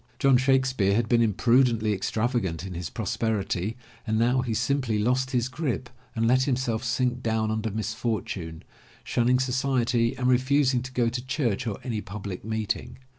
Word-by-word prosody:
John 135 0 +4
Shakespeare 130 -6 +2
had 115 0 +1
been 115 0 +3
imprudently 115 0 +3
extravagant 100 -3 -1
in 95 - -6
his 85 -2 -5
prosperity 110 -1 -2 0.3
and 110 0 +1
now 125 +3 +3
he 120 -3 -2
simply 125 -2 0
lost 125 +5 +1
his 125 -3 0
grip 130 -2 -3 0.2
and 115 0 +1
let 130 +2 +4
himself 125 -4 -1
sink 125 0 0
down 110 -2 0
under 110 0 -1
misfortune, 105 -6 -3 0.4
shunning 125 +1 +2
society 125 -2 +1
and 125 - -2
refusing 130 0 +3
to 130 +1 -7
go 120 -2 +2
to 120 +1 -4
church 130 -5 -1
or 105 - -2
any 115 -5 -3
public 100 -1 -7
meeting. 110 +2 -3
120 Hz, 160 wpm, -26 LUFS, 110-130 Hz, 0.4 s, John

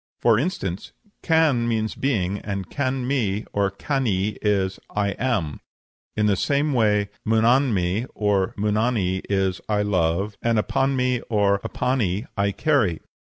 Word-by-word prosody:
For 115 -2 +4
instance, 100 - -3 0.3
can 155 -8 +3
means 110 -2 -1
being, 100 -8 -1
and 100 -2 -4
Can 130 -2 -1
mi, 110 -6 0
or 100 -1 +1
Cani, 105 -3 -1
is 95 -3 0 0.2
'I 105 -1 +1
am.' 105 - -1 0.6
In 105 - +2
the 105 -1 +3
same 145 +6 +1
way 105 -4 +2
Munanmi, 110 -3 +2
or 100 -3 +1
Munani, 105 -2 0
is 95 -2 0
'I 105 -1 +2
love,' 95 +1 0
and 115 -1 +1
Apanmi, 125 +2 +1
or 100 -3 +2
Apani, 115 -2 -1
'I 100 0 +1
carry.' 110 - +1
105 Hz, 130 wpm, -23 LUFS, 100-125 Hz, 0.6 s, For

